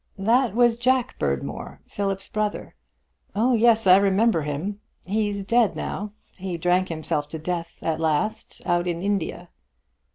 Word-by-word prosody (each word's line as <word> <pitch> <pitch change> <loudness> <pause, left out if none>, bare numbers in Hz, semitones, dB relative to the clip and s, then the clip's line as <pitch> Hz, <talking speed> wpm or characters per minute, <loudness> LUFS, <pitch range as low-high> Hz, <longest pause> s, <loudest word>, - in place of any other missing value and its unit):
"That 230 +3 +2
was 240 -1 +4
Jack 255 0 +1
Berdmore, 70 -1 -3
Philip's 195 -1 -3
brother. 215 -1 -3 0.6
Oh 240 +5 +3
yes, 225 -1 +4
I 185 0 +8
remember 200 -1 +3
him. 155 +8 -4 0.3
He's 205 0 -1
dead 230 0 +3
now. 205 +1 -4 0.2
He 185 -2 -4
drank 180 +2 +1
himself 155 -2 -2
to 160 - -5
death 170 +1 -4
at 160 -1 -1
last, 190 +8 -1
out 175 0 +1
in 175 0 -2
India." 185 -3 -2
195 Hz, 140 wpm, -24 LUFS, 170-220 Hz, 0.6 s, I